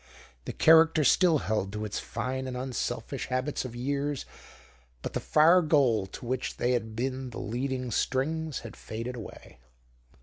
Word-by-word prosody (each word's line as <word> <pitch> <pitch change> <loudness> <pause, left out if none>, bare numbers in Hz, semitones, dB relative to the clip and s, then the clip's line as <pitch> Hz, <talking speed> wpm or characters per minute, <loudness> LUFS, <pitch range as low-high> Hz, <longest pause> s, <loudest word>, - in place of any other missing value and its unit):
The - - -3
character 160 -1 +5
still 170 +2 +5
held 105 -3 -1
to 105 0 -3
its 105 - -3
fine 130 +1 -4
and 125 -1 -4
unselfish 130 -1 -3
habits 130 +2 -2
of 120 -2 -7
years, 140 +2 -2 0.8
but - - -4
the - - -1
far 165 +4 +5
goal 135 - +3
to 110 - -9
which 125 +1 -3
they 120 - +1
had 110 -3 -1
been 130 +2 -3
the 120 - -9
leading 125 +2 -3
strings 150 +6 -1
had 115 - -9
faded 115 +3 -6
away. 110 - -10
130 Hz, 160 wpm, -28 LUFS, 120-145 Hz, 0.8 s, character